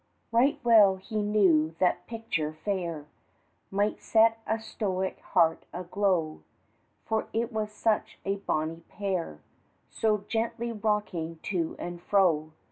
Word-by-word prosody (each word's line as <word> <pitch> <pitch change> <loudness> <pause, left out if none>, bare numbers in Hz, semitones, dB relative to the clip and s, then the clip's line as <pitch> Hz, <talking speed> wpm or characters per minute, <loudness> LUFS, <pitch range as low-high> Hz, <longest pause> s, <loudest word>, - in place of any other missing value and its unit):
Right 245 +5 +3
well 215 -5 +7
he 210 +3 -4
knew 180 -7 +3
that 180 0 +1
picture 210 -10 -2
fair 170 -7 -2 0.6
Might 205 +2 0
set 225 0 +4
a 220 +1 0
stoic's 190 -4 -3
heart 165 -1 +2
aglow, 180 -3 -1 0.6
For 220 0 -1
it 230 +2 -1
was 215 -1 -2
such 215 0 0
a 195 +1 0
bonnie 165 -4 -2
pair, 185 - -3 0.5
So 210 -2 0
gently 230 +1 -1
rocking 205 -7 -2
to 170 -5 -2
and 175 0 -6
fro. 170 -6 +2
200 Hz, 125 wpm, -28 LUFS, 170-220 Hz, 0.6 s, well